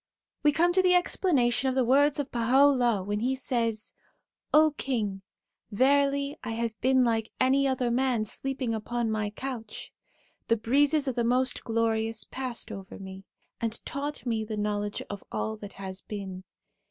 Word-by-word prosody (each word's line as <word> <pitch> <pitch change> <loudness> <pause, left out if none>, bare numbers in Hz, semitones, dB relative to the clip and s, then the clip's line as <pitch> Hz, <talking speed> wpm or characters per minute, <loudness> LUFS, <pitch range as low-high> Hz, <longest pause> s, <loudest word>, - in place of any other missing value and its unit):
We 295 - +5
come 345 +4 +3
to 375 - +5
the 365 -1 +4
explanation 270 -9 +2
of 260 - -2
the 260 -2 +2
words 285 +4 +4
of 285 -1 -3
Baha' 240 +2 +2 0.2
u'llah 240 -6 +1
when 205 +2 -2
he 255 +4 0
says: 230 -4 -2 0.3
' - - -59
O 310 0 +4
King, 210 -9 -2 0.5
verily 280 +4 +2
I 225 - -3
have 230 0 -2
been 260 0 +4
like 225 -2 0
any 270 +2 +3
other 255 -2 0
man 245 -3 +1
sleeping 260 +1 -3
upon 225 +1 -2
my 215 -1 -1
couch; 230 -1 -6 0.6
the 230 - +3
breezes 285 +6 +2
of 260 - 0
the 240 0 0
Most 250 +2 +1
Glorious 225 -1 0
passed 255 -3 -4
over 195 -1 -8
me, 190 0 -9 0.3
and 230 0 -1
taught 285 +1 -4
me 225 -3 0
the 215 0 -5
knowledge 205 0 -2
of 200 -1 -7
all 220 - -2
that 205 -1 -9
has 190 -1 -7
been. 190 -3 -7
240 Hz, 170 wpm, -28 LUFS, 215-270 Hz, 0.6 s, We